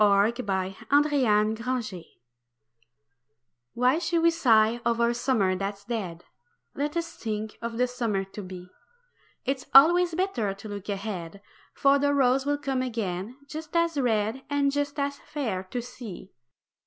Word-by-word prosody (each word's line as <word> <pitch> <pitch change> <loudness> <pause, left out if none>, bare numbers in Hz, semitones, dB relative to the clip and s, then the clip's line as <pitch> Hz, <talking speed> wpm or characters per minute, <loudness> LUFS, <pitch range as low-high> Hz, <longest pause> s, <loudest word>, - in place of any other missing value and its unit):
WHY 200 +2 +4
SHOULD 215 +2 +1
WE 250 +2 -1
SIGH 185 -6 -8 1.7
Why 255 +6 +3
should 340 -1 0
we 335 - +6
sigh 235 -7 +3
o'er 235 0 +2
a - - +1
summer 235 -6 +1
that's 200 +1 -4
dead 190 -8 -4 0.5
Let 295 +3 -2
us 335 0 -3
think 215 -1 -4
of 230 0 -4
the 250 - +3
summer 235 -6 -1
to 195 +2 -9
be. 180 -1 -9 0.8
It 265 -1 -2
always 340 +4 +7
better 250 - -1
to 200 +2 -10
look 205 -1 -7
ahead, 195 -3 -4 0.4
For 280 0 +4
the 285 0 +2
rose 265 0 +3
will 290 0 +2
come 270 -3 -1
again 220 -2 -3
just 315 +2 -8
as 335 -1 +2
red 230 -2 0
And 285 -1 +2
just 285 +1 -2
as 280 0 -1
fair 235 -11 -4
to 240 +6 -4
see. 240 -7 -9
240 Hz, 150 wpm, -27 LUFS, 205-280 Hz, 1.7 s, always